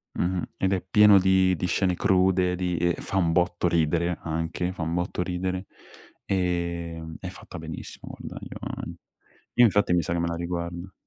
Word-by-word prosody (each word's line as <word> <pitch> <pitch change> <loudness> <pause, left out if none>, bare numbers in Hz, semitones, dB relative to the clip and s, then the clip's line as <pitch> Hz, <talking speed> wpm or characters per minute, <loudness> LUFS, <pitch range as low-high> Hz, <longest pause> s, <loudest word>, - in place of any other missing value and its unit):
Mh-mh. 90 0 0 0.2
Ed 95 0 +1
è 95 - 0
pieno 105 +1 +6
di 95 0 +4
di 90 - -2
scene 90 +1 +1
crude, 95 -1 +3
di 90 -1 -1
ehm, 85 +1 +2
fa 95 - -1
un 85 -3 +3
botto 90 +1 +1
ridere 85 +1 +1
anche, 80 +2 -2
fa 90 - -7
un 80 +1 -1
botto 90 0 -1
ridere. 90 +1 -2 0.6
Ehm, 85 -3 -2
è - - -6
fatta - - -9
benissimo, - - -8
guarda - - -8
io - - -8 1.0
io 120 - +10
infatti 105 -4 +3
mi 90 - +4
sa 85 - -2
che 85 - 0
me 85 - 0
la 85 - -2
riguardo. 85 +1 -4
90 Hz, 180 wpm, -26 LUFS, 85-95 Hz, 1.0 s, io